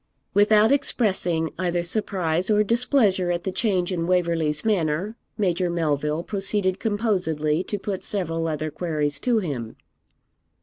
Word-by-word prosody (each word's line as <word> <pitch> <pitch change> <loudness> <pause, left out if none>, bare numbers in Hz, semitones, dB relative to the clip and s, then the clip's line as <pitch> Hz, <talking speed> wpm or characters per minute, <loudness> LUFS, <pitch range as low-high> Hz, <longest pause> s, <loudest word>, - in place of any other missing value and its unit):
Without 210 +2 +5
expressing 185 - +1
either 175 -1 0
surprise 180 -2 -1
or 210 0 +4
displeasure 225 -5 +2
at 175 0 -1
the 190 - -2
change 185 -2 0
in 170 -2 -1
Waverley's 170 -4 +1
manner, 190 0 0 0.2
Major 180 -3 +1
Melville 155 -1 -1
proceeded 195 -1 0
composedly 185 -8 0
to 205 - -3
put 195 -1 -4
several 165 -5 -1
other 155 -1 -3
queries 150 -3 -2
to 245 -2 +1
him. 135 - -3
180 Hz, 130 wpm, -24 LUFS, 160-205 Hz, 0.2 s, Without